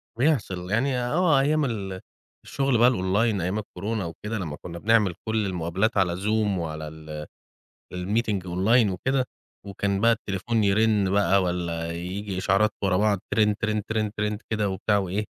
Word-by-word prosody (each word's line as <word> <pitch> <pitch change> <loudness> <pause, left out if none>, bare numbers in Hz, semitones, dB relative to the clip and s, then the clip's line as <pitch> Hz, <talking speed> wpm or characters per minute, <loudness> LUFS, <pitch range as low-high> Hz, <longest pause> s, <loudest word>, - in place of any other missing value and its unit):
بيحصل 110 - 0
يعني 125 +4 +1
آه 145 +5 +2
أيام 150 +2 +2
ال 95 -6 -4 0.4
الشغل 135 -3 +1
بقى 120 +2 +6
الonline 100 -1 +1
أيام 90 +5 -1
الكورونا 105 0 -4
وكده، 105 +7 -5
لمّا 80 -6 -5
كنا 85 -1 -7
بنعمل 105 -2 +3
كل 110 -1 +1
المقابلات 95 +4 -1
على 90 -3 +2
Zoom 105 -1 +1
وعلى 80 -2 -4
ال 75 -1 -8 0.7
الmeeting 100 +2 -1
online 100 +6 +3
وكده. 130 +8 0 0.4
وكان 100 0 -2
بقى 115 +1 +5
التليفون 110 +1 -1
يرن 105 0 +3
بقى 100 -1 +3
والّا 85 -2 -2
ييجي 95 +3 -4
إشعارات 100 +3 +2
ورا 95 -2 +2
بعض، 105 -1 +2
ترن، 105 -2 +3 0.3
ترن، 110 -1 -1
ترن 105 0 -1
كده 105 -2 0
وبتاع 100 +2 +1
وإيه؟ 100 +2 -1
100 Hz, 150 wpm, -25 LUFS, 90-110 Hz, 0.7 s, بقى